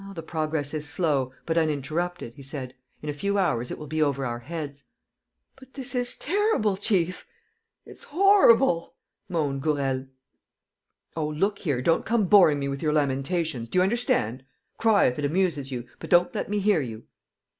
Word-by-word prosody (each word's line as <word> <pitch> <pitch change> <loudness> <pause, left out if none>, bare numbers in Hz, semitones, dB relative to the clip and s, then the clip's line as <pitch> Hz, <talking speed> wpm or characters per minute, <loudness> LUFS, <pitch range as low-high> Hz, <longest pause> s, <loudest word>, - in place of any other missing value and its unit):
"The 165 - -6
progress 155 -2 -2
is 150 -1 -3
slow, 145 -8 0
but 165 0 +1
uninterrupted," 155 -1 -2
he 140 - -13
said 135 -2 -6 0.3
"In 150 - -4
a - - -1
few 200 +7 -1
hours 135 -11 0
it - - -5
will 150 - -8
be 155 +2 -2
over 140 -3 +1
our 120 -1 -3
heads." 145 +1 -7 0.7
"But 265 0 -18
this 270 -1 -4
is 245 -1 -1
terrible, 360 - +1
chief, 185 -3 -1 0.6
it's - - -13
horrible!" 285 - +4 0.3
moaned 145 -6 -1
Gourel. 135 -3 -1 1.1
"Oh, 155 -2 -1
look 195 +7 -1
here, 140 -8 -1
don't 165 - +2
come 225 -1 +1
boring 180 -6 +6
me 140 -1 -2
with 140 0 -4
your 150 -2 +1
lamentations, 140 -2 -1
do - - -2
you 180 - +5
understand? 185 - 0 0.4
Cry, 220 -3 +4
if 125 +3 0
it 145 - -1
amuses 150 -4 0
you, 125 -2 -4
but - - -8
don't 175 0 +4
let - - -3
me 210 - 0
hear 200 -4 +2
you!" 115 -4 -7
155 Hz, 175 wpm, -26 LUFS, 140-195 Hz, 1.1 s, boring